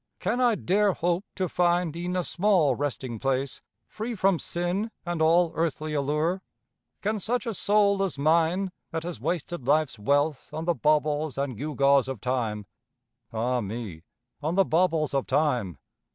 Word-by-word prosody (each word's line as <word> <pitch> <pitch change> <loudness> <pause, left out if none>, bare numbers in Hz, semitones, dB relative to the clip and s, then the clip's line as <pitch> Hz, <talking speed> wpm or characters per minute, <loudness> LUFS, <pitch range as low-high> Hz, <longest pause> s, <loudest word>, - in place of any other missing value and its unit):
Can 245 +3 0
I 240 -3 +4
dare 200 +1 +2
hope 175 +3 -1
to 185 -2 -1
find 175 -1 +1
e'en 175 +2 -3
a 180 - +1
small 175 -8 +2
resting 130 -4 -3
place 135 0 -1 0.3
Free 225 +2 -5
from 195 -3 +2
sin 175 +5 -2 0.2
and 175 -2 -2
all 165 +1 +4
earthly 155 -1 -2
allure? 150 +6 0 0.6
Can 215 +2 0
a - - -5
soul 210 -3 +1
such 195 - +2
as 155 - -9
mine, 165 +6 +2 0.2
that 160 0 -3
has 175 0 -6
wasted 170 -5 -3
life's 150 -5 +2
wealth 145 +5 +1
On 160 +1 -3
the 175 - +2
baubles 150 -2 +1
and 140 -3 -2
gewgaws 140 0 +2
of 135 -4 -4
time, 115 -4 -2 0.7
(Ah 120 +2 0
me, 105 -5 -6 0.4
on 155 +4 -1
the 195 0 +4
baubles 165 -3 +1
of 135 -1 0
time!) 125 - +1
160 Hz, 160 wpm, -27 LUFS, 140-180 Hz, 0.7 s, I